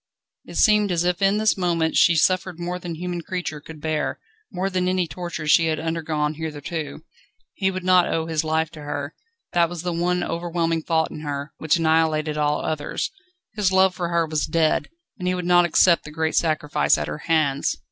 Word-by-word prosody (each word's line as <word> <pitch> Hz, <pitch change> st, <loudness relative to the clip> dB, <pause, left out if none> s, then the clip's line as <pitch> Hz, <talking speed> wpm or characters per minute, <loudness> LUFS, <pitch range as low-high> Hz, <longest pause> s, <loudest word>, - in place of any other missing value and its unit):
It -, -, -11 dB
seemed 210 Hz, -3 st, +4 dB
as 170 Hz, -1 st, +1 dB
if 180 Hz, +1 st, 0 dB
in 195 Hz, +1 st, +3 dB
this 215 Hz, 0 st, +3 dB
moment 170 Hz, -3 st, 0 dB
she 170 Hz, -, +5 dB
suffered 185 Hz, +1 st, +1 dB
more 175 Hz, +1 st, -3 dB
than 175 Hz, -2 st, -6 dB
human 175 Hz, +1 st, -4 dB
creature 175 Hz, -3 st, -4 dB
could 155 Hz, +1 st, -11 dB
bear, 155 Hz, 0 st, -2 dB, 0.3 s
more 190 Hz, -1 st, -2 dB
than 185 Hz, -1 st, -1 dB
any 185 Hz, -1 st, +1 dB
torture 170 Hz, 0 st, -6 dB
she 165 Hz, +2 st, +4 dB
had 155 Hz, -1 st, 0 dB
undergone 155 Hz, -2 st, -1 dB
hitherto. 155 Hz, -1 st, -5 dB, 0.5 s
He 190 Hz, -2 st, 0 dB
would 185 Hz, -1 st, -4 dB
not 185 Hz, -1 st, +4 dB
owe 160 Hz, -1 st, 0 dB
his 160 Hz, -1 st, -1 dB
life 160 Hz, 0 st, 0 dB
to 155 Hz, -3 st, -11 dB
her. 145 Hz, 0 st, -4 dB, 0.4 s
That 170 Hz, -1 st, +3 dB
was 175 Hz, -1 st, -6 dB
the 175 Hz, -1 st, -2 dB
one 180 Hz, +1 st, 0 dB
overwhelming 165 Hz, -1 st, -1 dB
thought 160 Hz, 0 st, 0 dB
in -, -, -7 dB
her, 145 Hz, -1 st, -5 dB
which 155 Hz, -, +2 dB
annihilated 160 Hz, -1 st, +1 dB
all 150 Hz, 0 st, 0 dB
others. 155 Hz, -2 st, -2 dB, 0.4 s
His 210 Hz, -4 st, +1 dB
love 190 Hz, 0 st, +4 dB
for 175 Hz, -2 st, -3 dB
her 170 Hz, -1 st, +1 dB
was 155 Hz, -1 st, -1 dB
dead, 160 Hz, -2 st, +1 dB, 0.3 s
and 180 Hz, -, -3 dB
he 185 Hz, -, +1 dB
would 180 Hz, -1 st, -4 dB
not 175 Hz, 0 st, +5 dB
accept 170 Hz, +1 st, +4 dB
the -, -, -9 dB
great 160 Hz, 0 st, -1 dB
sacrifice 150 Hz, -, +2 dB
at 75 Hz, -1 st, -3 dB
her 75 Hz, 0 st, -5 dB
hands. 150 Hz, -4 st, +1 dB
165 Hz, 200 wpm, -23 LUFS, 155-180 Hz, 0.5 s, she